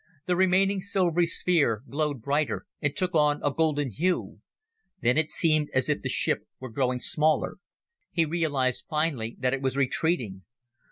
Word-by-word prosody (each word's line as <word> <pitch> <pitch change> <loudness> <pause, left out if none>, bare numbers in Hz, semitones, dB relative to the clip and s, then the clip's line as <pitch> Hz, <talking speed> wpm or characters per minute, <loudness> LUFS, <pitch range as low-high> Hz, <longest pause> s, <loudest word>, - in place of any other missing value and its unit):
The 180 - +1
remaining 190 +2 +3
silvery 175 -3 +1
sphere 150 - +1
glowed 145 -4 -2
brighter, 145 - -1 0.2
and 145 -3 -1
took 185 -2 0
on 150 -2 +3
a 145 - +1
golden 145 -4 0
hue. 180 - -1 0.6
Then 120 +1 +2
it 155 0 +1
seemed 155 -3 +3
as 130 +3 +1
if 150 - 0
the - - -3
ship - - 0
were 130 -2 -8
growing 125 +1 0
smaller. 155 +4 +1 0.5
He 165 -2 +2
realized 145 -6 -1
finally 150 -8 -1
that 125 0 0
it 135 - -2
was 135 0 -1
retreating. 130 - 0
150 Hz, 160 wpm, -27 LUFS, 130-170 Hz, 0.6 s, remaining